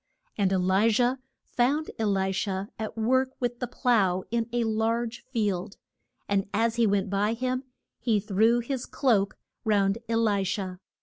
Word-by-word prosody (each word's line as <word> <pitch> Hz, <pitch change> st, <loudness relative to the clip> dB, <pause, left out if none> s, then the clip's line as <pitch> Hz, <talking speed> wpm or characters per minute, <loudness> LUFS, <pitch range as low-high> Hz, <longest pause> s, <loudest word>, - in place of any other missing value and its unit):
And 195 Hz, -3 st, +1 dB
E -, -, +3 dB
li 190 Hz, +4 st, +3 dB
jah 245 Hz, +3 st, +2 dB, 0.3 s
found 280 Hz, +6 st, 0 dB
E 220 Hz, -, +1 dB
li 195 Hz, -2 st, +1 dB
sha 190 Hz, 0 st, -2 dB
at 220 Hz, 0 st, -5 dB
work 260 Hz, +4 st, +2 dB
with 245 Hz, -1 st, -2 dB
the 250 Hz, -, -2 dB
plough 200 Hz, -8 st, +2 dB
in 230 Hz, 0 st, 0 dB
a 240 Hz, 0 st, +1 dB
large 225 Hz, +1 st, -1 dB
field. 200 Hz, -6 st, -1 dB, 0.5 s
And 200 Hz, -1 st, 0 dB
as 230 Hz, +2 st, +1 dB
he 230 Hz, -2 st, +4 dB
went 200 Hz, -1 st, 0 dB
by 205 Hz, +2 st, +1 dB
him 255 Hz, +2 st, -2 dB, 0.3 s
he 225 Hz, -3 st, +2 dB
threw 220 Hz, +4 st, +2 dB
his 255 Hz, +1 st, -4 dB
cloak 210 Hz, -8 st, +1 dB, 0.3 s
round 205 Hz, -1 st, +2 dB
E 230 Hz, -, +1 dB
li 210 Hz, -3 st, +2 dB
sha. 185 Hz, -1 st, -3 dB
220 Hz, 170 wpm, -27 LUFS, 195-240 Hz, 0.5 s, he